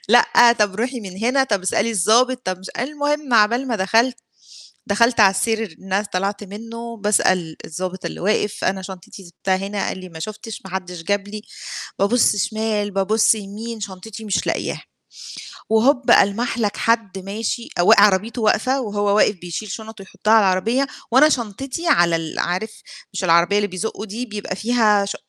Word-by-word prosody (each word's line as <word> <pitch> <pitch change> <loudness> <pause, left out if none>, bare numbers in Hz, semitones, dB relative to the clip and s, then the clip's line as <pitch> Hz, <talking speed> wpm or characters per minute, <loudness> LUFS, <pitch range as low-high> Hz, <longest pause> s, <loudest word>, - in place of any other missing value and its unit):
لأ، 240 +1 +6
طَب 210 -4 0
روحي 245 +3 -2
من 190 -3 -9
هنا، 265 +3 +3
طَب 205 -7 -1
اسألي 200 +4 0
الضابط، 235 +6 +3
طَب 185 -1 -2
مش 190 - -9
المهم 290 0 -1
عبال 235 +5 +3
ما 230 - 0
دخلت، 225 +6 +2 0.7
دخلت 230 +4 +2
على 195 -3 +7
السير 220 -3 -2
إن 195 +2 -1
س - - -8
طلعت 200 +3 -2
منه، 230 +3 -8
باسأل 185 -5 +1
الضابط 185 +3 -5
اللي - - -5
واقف 210 +2 -1
أنا 190 0 0
شنطتي 190 +2 -10
سِبتها 185 +2 -2
هنا، 195 +1 -3
قال - - -4
لي 185 -1 -10
ما 160 - -10
شُفتش، 215 +5 -7
ما 190 - -9
حدش 180 -3 -5
جاب 200 +1 -1
لي، 210 +1 -7 0.6
بابُصّ 210 +2 +3
شِمال، 210 0 -1
بابُصّ 205 +3 +3
يمين، 215 +3 -7
شنطتي 205 +2 -8
مش 205 - -1
لاقياها. - - -2 0.9
وهوب، 250 +4 +3
ألمح 230 +4 +3
لَك 210 -3 -1
حدّ 230 -4 0
ماشي 215 +4 -4
وق 180 - +6
عربيته 210 +4 +2
واقفة 255 +5 +2
وهو 205 -2 0
واقف 210 - +3
بيشيل 180 +5 -6
شنط 220 +1 -8
ويحطّها 210 +2 -3
على 225 - +7
العربية، 225 +9 +1 0.2
وأنا 275 +6 +6
شنطتي 270 - -3
على 170 -1 +4
ال 165 -1 -5
عارف، 185 +5 -2 0.4
مش 190 - -4
العربية 170 +3 +4
اللي 205 0 +1
بيزقوا 205 +3 -5
دي 225 +4 -5
بيبقى 210 -4 -5
فيها 215 -2 +2
ش 200 - -4
210 Hz, 170 wpm, -20 LUFS, 190-230 Hz, 0.9 s, على